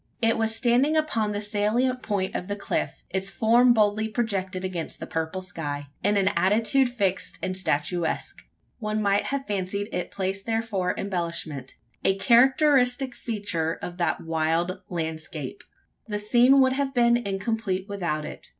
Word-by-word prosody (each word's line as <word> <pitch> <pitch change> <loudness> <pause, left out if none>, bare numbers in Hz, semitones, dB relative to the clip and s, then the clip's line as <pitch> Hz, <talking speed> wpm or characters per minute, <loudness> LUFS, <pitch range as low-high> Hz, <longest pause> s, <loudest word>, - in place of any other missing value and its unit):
It 225 -1 +4
was 225 0 +1
standing 250 +6 +3
upon 225 -9 0
a - - -1
salient 220 +5 +1
point 200 -4 -2
of 180 - -4
the 205 - -2
cliff 200 - -3
its 190 0 -1
form 230 +6 +4
boldly 215 -1 +2
projected 195 -5 -2
against 175 -3 -4
the - - -5
purple 165 +3 -3
sky, 145 -5 -5
in 205 +1 +2
an 195 -1 +3
attitude 225 +7 +2
fixed 200 -6 -1
and 185 - -1
statuesque. 170 -1 -1 0.4
One 215 -1 -2
might 200 -1 +2
have 275 0 -2
fancied 200 +1 -2
it 180 - -2
placed 195 +1 -3
there 225 0 0
for 195 -5 -1
embellishment 170 -8 -4 0.3
a 195 - +3
characteristic 255 +4 +4
feature 200 -10 -2
of 175 0 -7
that 175 - 0
wild 165 +2 -1
landscape. 160 -1 -5 0.4
The 210 -1 -2
scene 245 +6 +5
would 260 0 +4
have 270 0 -2
been 235 -1 +5
incomplete 200 -2 -2
without 170 -7 -2
it. - - -9
205 Hz, 155 wpm, -25 LUFS, 180-230 Hz, 0.4 s, scene